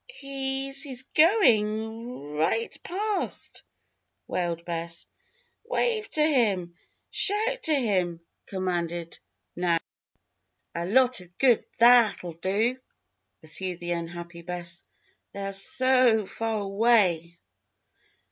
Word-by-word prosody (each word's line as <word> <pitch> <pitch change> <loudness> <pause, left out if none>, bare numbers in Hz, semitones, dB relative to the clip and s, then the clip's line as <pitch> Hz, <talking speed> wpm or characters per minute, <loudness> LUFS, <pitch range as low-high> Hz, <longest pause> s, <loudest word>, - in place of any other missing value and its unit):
"He's 275 - -4
he's 265 -3 -7
going 225 - +2
ri 150 +1 +1
i - - +3
ight - - -11
past!" 410 +3 -3 0.6
wailed 170 -2 -2
Bess. 170 0 -4 0.6
"Wave 455 -2 0
to 305 -1 +2
him! 205 - +1 0.4
Shout 445 +5 +1
to 315 -2 +2
him!" 185 -10 0 0.3
commanded 175 -3 -3 0.4
Nan. 175 -1 +1 0.9
"A 170 +1 -3
lot 255 +1 +4
of 175 0 -18
good 250 -4 +4
tha 235 - +5
a 240 -2 +8
at'll 180 -4 -7
do!" 205 +9 0 0.6
pursued 175 +3 -3
the 175 0 -4
unhappy 170 0 -5
Bess. 175 0 -6 0.5
"They're 195 0 -4
so 250 +3 +3
o - - -8
fa 225 - -6
a - - +1
ar 210 - -1
away." 195 -5 +2
205 Hz, 120 wpm, -27 LUFS, 175-260 Hz, 0.9 s, a